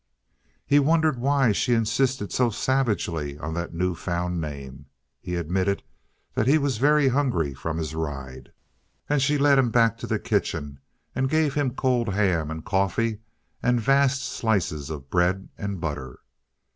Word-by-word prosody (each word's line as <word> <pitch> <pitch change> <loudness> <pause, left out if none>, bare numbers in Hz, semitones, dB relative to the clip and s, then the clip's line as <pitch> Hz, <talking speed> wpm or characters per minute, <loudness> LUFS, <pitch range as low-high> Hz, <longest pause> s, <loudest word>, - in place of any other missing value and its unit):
He 145 - +4
wondered 155 -2 +2
why 135 -2 +3
she 120 +4 +1
insisted 115 0 0
so 125 -2 +3
savagely 100 - -1
on 80 +2 -5
that 85 +1 -3
newfound 90 0 -2
name? 70 -2 -7 0.3
He 90 - -5
admitted 95 +4 -1 0.5
that 110 - 0
he 145 +4 +6
was 140 -6 -1
very 145 0 +4
hungry 120 - 0
from 80 +4 -4
his 80 -1 -3
ride, 70 -5 -6 0.6
and 145 -1 +1
she 145 +2 +2
led 140 -1 +5
him 125 -3 +3
back 115 -2 +3
to - - -6
the - - 0
kitchen 70 -3 -2 0.3
and 130 +1 0
gave 155 -1 +2
him 140 -4 -1
cold 125 -5 +1
ham 90 -7 +1
and 80 0 -6
coffee 105 +3 0 0.4
and 125 -1 +2
vast 135 +3 +3
slices 90 - -1
of 70 -3 -7
bread 90 +2 +1
and 100 -2 -4
butter. 70 -6 -5
100 Hz, 155 wpm, -25 LUFS, 80-130 Hz, 0.6 s, he